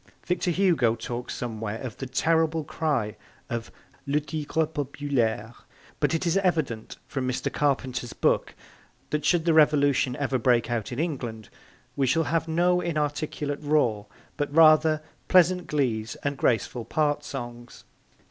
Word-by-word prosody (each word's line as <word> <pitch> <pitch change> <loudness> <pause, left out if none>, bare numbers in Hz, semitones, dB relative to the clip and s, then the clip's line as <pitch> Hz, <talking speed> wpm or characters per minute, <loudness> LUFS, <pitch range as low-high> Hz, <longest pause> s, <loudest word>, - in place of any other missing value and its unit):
Victor 180 0 0
Hugo 170 - +3
talks 120 +1 -5
somewhere 110 -3 -4
of 125 -5 -7
the 135 - -5
terrible 160 +4 +1
cry 140 -9 -1 0.4
of 115 -1 -4 0.4
'Le 145 +2 +2
Tigre 155 +1 -1
Populaire,' 140 -7 -2 0.5
but - - +2
it 165 - -2
is 170 +2 +2
evident 160 - -1
from 135 -3 -3
Mr. 125 - -2
Carpenter's 130 -4 -1
book - - +1 0.6
that 150 -1 -1
should 170 -2 +2
the 165 - +4
Revolution 145 -4 +4
ever 135 -2 -1
break 120 0 +2
out 115 -1 -2
in 120 - -5
England 125 - -3 0.5
we 135 -2 +1
shall 165 +6 +3
have 165 +2 0
no 175 +2 +2
inarticulate 150 -2 -2
roar 125 -9 +1 0.3
but, 145 -1 -2
rather, 155 0 +5 0.2
pleasant 180 0 +4
glees 115 -7 -1
and 145 0 -1
graceful 120 -1 0
part 150 +2 0
songs. 120 -3 -8
145 Hz, 140 wpm, -26 LUFS, 120-160 Hz, 0.6 s, rather